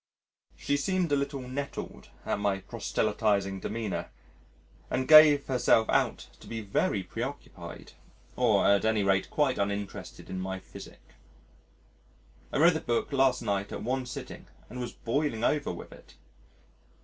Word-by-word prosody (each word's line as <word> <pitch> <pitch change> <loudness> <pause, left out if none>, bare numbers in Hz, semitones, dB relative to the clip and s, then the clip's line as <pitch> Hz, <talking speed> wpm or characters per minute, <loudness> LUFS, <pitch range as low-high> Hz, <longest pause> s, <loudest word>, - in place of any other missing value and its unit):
She 145 - 0
seemed 180 +2 0
a - - +4
little 140 -1 -2
nettled 140 +3 -6 0.2
at - - -1
my 100 -1 0
proselytising 100 -2 -1
demeanour 110 0 -4 0.8
and 130 0 -1
gave 155 -2 +8
herself 125 -3 +3
out - - +1
to - - -14
be 115 - -4
very 100 -1 0
preoccupied - - -7 0.4
or 115 -5 +3
at 100 0 +4
any 110 -2 +2
rate 95 -1 +1
quite 145 -4 +1
uninterested 100 0 -4
in 95 - -5
my 95 0 -3
physic. 95 - -13 1.4
I - - -1
read 165 +4 +6
the 160 - -1
book 120 +4 -1
last 135 -2 +3
night 100 0 -1
at - - -5
one 130 +2 -2
sitting 125 - -8 0.2
and 125 - -6
was 120 -1 -4
boiling 120 -2 -2
over 145 +3 +1
with 85 - -9
it. - - -16
115 Hz, 145 wpm, -29 LUFS, 100-140 Hz, 1.4 s, gave